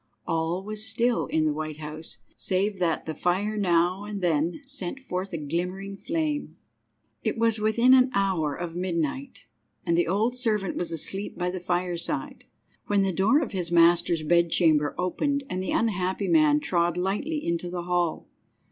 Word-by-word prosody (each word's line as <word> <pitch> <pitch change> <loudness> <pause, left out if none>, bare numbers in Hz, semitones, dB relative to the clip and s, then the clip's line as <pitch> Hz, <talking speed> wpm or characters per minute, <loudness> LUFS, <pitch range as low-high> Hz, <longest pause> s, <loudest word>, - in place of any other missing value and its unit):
All 165 +2 -1
was 215 +1 -4
still 235 +2 +1
in 155 -1 +1
the 155 - +1
White 155 0 -5
House, 155 +1 -7 0.2
save 195 +1 -1
that 170 -3 0
the 160 - -3
fire 190 +6 0
now 180 -1 +2
and 210 -1 -5
then 170 - 0
sent 270 -4 -5
forth 190 -6 -4
a 170 - -3
glimmering 180 +6 -3
flame. 305 +5 -3 0.7
III. - - +2
It - - -5
was 225 -1 +2
within 235 +4 +4
an 255 0 +6
hour 180 -7 +1
of 170 -1 -5
midnight, 165 -6 -3 0.4
and 170 - +2
the 175 0 +2
old 215 +7 +1
servant 215 -6 0
was 175 - -2
asleep 190 +5 -2
by 180 0 -1
the 185 - -4
fireside, 175 -1 -2 0.4
when 200 -1 +2
the 190 -1 0
door 215 - +3
of 295 - -3
his 180 -4 -1
master's 170 -1 +4
bedchamber 160 -2 +3
opened 280 +11 -1
and 185 - -2
the 190 - -4
unhappy 195 -3 0
man 305 -2 +4
trod 175 - +1
lightly 210 - -1
into 170 +1 -1
the 175 0 -4
hall. 175 -2 -1
180 Hz, 170 wpm, -26 LUFS, 170-210 Hz, 0.7 s, an